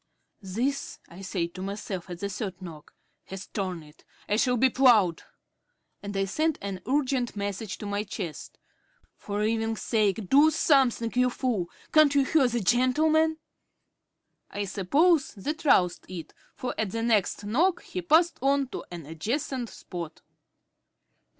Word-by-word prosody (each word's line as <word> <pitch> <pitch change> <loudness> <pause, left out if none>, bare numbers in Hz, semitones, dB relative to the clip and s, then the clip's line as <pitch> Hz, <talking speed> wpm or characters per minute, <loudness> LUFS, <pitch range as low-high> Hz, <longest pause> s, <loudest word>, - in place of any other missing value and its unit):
"This," 235 +9 -2
I 175 +3 -11
said 180 -3 -3
to 185 - -8
myself 195 -2 -5
at 175 0 -7
the 200 - -1
third 190 -3 -5
knock, 165 -5 -11 0.3
"has 190 +1 -8
torn 185 -5 -4
it. 150 0 -19 0.2
I 210 - +1
shall 250 +1 +2
be 265 - +5
ploughed," 220 -11 +4 0.8
and 200 -1 -5
I 195 - +1
sent 310 +10 0
an 195 -2 -5
urgent 260 -3 0
message 200 0 -4
to - - -8
my 205 0 -1
chest. 190 -6 -7 0.6
"For 205 0 -4
'eving's 225 0 -1
sake 210 -3 +1
do 290 - +6
something, 265 -7 +2
you 250 0 +3
fool. 235 -9 -2 0.2
Can't 305 -2 +6
you 280 -1 +4
hear 280 -2 +3
the 240 -1 -1
gentleman?" 310 - +3 1.1
I 205 0 -3
suppose 275 - +2
that 300 - -5
roused 180 -10 +3
it, 175 -3 -8 0.2
for 250 - -4
at 220 -3 0
the 230 +3 -3
next 215 -3 +1
knock 325 - +1
he 365 - -5
passed 340 +1 +3
on 275 0 +2
to - - -6
an 170 -3 -8
adjacent 235 - -3
spot.... 170 -4 -8
220 Hz, 150 wpm, -27 LUFS, 190-270 Hz, 1.1 s, do